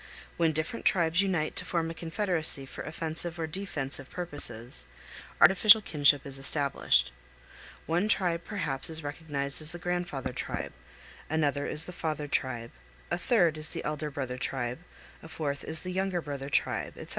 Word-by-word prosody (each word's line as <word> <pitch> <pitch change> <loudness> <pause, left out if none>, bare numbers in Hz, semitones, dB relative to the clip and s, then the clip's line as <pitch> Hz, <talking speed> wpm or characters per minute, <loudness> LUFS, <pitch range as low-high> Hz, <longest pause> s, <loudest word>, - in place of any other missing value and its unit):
When 165 -2 +3
different 155 +9 -2
tribes 170 -1 +3
unite 180 -6 0
to - - +5
form 165 -2 -1
a - - -5
confederacy 165 -4 -1
for - - -8
offensive 165 +2 -2
or 165 - -1
defensive 155 -7 -3
purposes, 135 - -2 0.5
artificial 205 +3 +8
kinship 145 -7 +3
is 135 -1 -2
established. 140 - +2 0.7
One 175 +6 +1
tribe 175 -5 +1
perhaps 155 -10 -3
is 160 -1 0
recognized 145 -1 -3
as 155 +2 -1
the - - -5
grandfather 175 -7 -2
tribe, - - -4 0.6
another 145 -2 +1
is 155 +2 0
the - - -6
father 155 -3 -3
tribe, 120 -4 0 0.4
a 175 - +1
third 175 -8 +3
is 150 - -2
the - - -4
elder 150 0 -2
brother 130 -3 -4
tribe, 125 0 -2 0.4
a 160 - -11
fourth 145 -3 -3
is 160 0 +4
the 185 - -3
younger 190 -1 0
brother 140 -3 -5
tribe, - - 0
etc. - - -9
155 Hz, 160 wpm, -29 LUFS, 140-175 Hz, 0.7 s, artificial